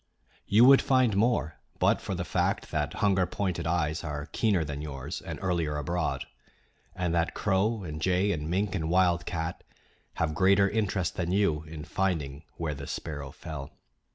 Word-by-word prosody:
You 110 +5 +6
would 135 +1 +8
find 130 -6 +3
more 100 -8 +1 0.2
but - - +3
for - - -3
the - - -3
fact - - -1
that - - -1
hunger 95 -2 +3
pointed 90 -4 -2
eyes 80 -1 0
are 75 -2 -4
keener 100 -1 +1
than 75 -1 -5
yours 70 -4 -5
and - - -6
earlier 85 -5 0
abroad, 85 +2 -1 0.7
and 90 -2 -1
that 85 -1 0
crow 105 +2 +1
and 75 -2 -6
jay 95 +4 +2
and 75 -3 -3
mink 95 +3 0
and 80 -5 -2
wildcat 85 -2 +1 0.5
have 80 -2 0
greater 100 +4 +4
interest 100 -4 -1
than 90 -1 -1
you 95 -6 +2
in 75 -1 -7
finding 80 -7 -2
where 80 -3 -2
the 70 0 -7
sparrow 75 -4 -5
fell. 75 -4 -7
85 Hz, 165 wpm, -28 LUFS, 75-100 Hz, 0.7 s, would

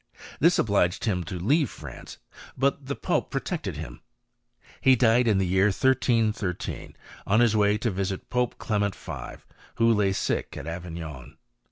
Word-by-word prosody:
This 170 +4 +4
obliged 100 -4 +1
him 90 -5 0
to 95 +1 -5
leave 140 - +2
France; - - -10 0.4
but 140 +1 0
the 140 - -2
pope - - -1
protected - - -3
him. - - -8 0.8
He 130 -1 +6
died 120 0 +4
in 105 -3 +3
the 95 - +2
year 95 +2 +3
1313, 110 -4 0 0.3
on 105 +3 +4
his 120 -2 +4
way 105 0 +3
to 115 +1 -1
visit 95 0 -3
Pope 125 -1 0
Clement 100 -2 -1
V. - - -8 0.3
who 115 0 +4
lay 105 -2 +2
sick 95 - -2
at - - -7
Avignon. 80 -6 -7
105 Hz, 155 wpm, -26 LUFS, 95-120 Hz, 0.8 s, He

